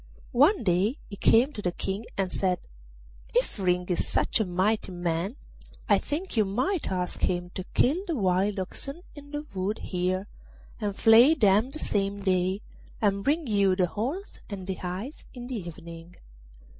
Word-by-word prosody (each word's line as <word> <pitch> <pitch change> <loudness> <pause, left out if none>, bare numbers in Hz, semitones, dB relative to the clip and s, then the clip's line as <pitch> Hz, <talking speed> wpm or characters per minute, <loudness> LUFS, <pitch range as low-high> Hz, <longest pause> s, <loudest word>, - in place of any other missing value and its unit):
One 290 - +5
day 195 - +2
he 200 - -6
came 240 +7 +4
to 210 - -5
the 180 - 0
King 195 +5 -3
and 190 -2 0
said, 185 -2 +1 0.8
'If - - +1
Ring 180 -1 +1
is 175 - 0
such - - +1
a 220 - +2
mighty 190 +3 0
man, 175 +4 -2 0.5
I - - +5
think 315 +4 -4
you 220 - +4
might 255 - -1
ask 180 -1 -2
him 175 0 0
to 185 - -5
kill 315 +9 +3
the 335 - -1
wild 195 -1 +1
oxen 275 - -6
in 285 -1 -12
the 295 +1 -5
wood 195 +3 -1
here, 185 +1 -1 0.5
and 205 -3 -2
flay 235 +9 +7
them 210 -1 +4
the 295 - -2
same 200 -7 -1
day, 185 +1 +1 0.4
and 200 -2 +1
bring 305 +4 +1
you 200 -5 +3
the 185 -1 +3
horns 255 - -4
and 195 -3 -6
the 190 - -2
hides 185 +10 -6
in 245 -1 -7
the 250 -1 -4
evening. 170 +1 -10
200 Hz, 170 wpm, -27 LUFS, 185-250 Hz, 0.8 s, flay